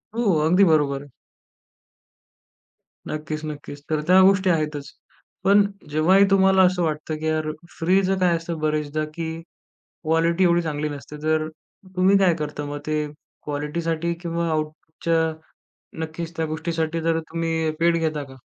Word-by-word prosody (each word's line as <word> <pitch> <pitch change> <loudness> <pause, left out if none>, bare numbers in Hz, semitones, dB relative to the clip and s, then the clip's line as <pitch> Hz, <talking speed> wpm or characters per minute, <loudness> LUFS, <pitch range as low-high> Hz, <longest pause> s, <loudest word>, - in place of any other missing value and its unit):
हो, 240 - 0 0.2
अगदी 180 +5 +5
बरोबर 140 -3 +2
आहे. 145 - -14 2.0
नक्कीच, 155 0 -4
नक्कीच. 145 -1 -7
तर 155 -1 0
त्या 185 +1 +7
गोष्टी 190 0 +4
आहेतच. 150 -3 -1 0.5
पण 200 +1 +6 0.3
जेव्हाही 180 +7 +4
तुम्हाला 190 -1 +5
असं 180 -1 +2
वाटतं, 155 0 -2
की 155 - -5
यार 155 -1 0 0.3
फ्रीचं 190 +3 +2
काय 175 -2 +3
असतं 165 0 -5
बरेचदा, 155 0 -1
की 165 0 -4 0.6
क्वालिटी 165 +3 +2
एवढी 175 0 +3
चांगली 150 -1 -2
नसते. 145 +1 -8
तर 155 0 +1 0.5
तुम्ही 190 +2 +5
काय 185 -4 +4
करता 150 -2 -4
मग 145 0 -5
ते 155 -1 0 0.4
क्वालिटीसाठी? 160 +3 -2
किंवा 170 -1 -2
आऊपुटच्या 160 +1 -1 0.7
नक्कीच 165 +1 -6
त्या 160 - 0
गोष्टीसाठी 160 +1 -2
जर 165 0 +1
तुम्ही 165 -1 -1
पेड 170 0 +3
घेता 155 -2 -1
का? 135 -1 -13
160 Hz, 140 wpm, -23 LUFS, 155-170 Hz, 2.0 s, त्या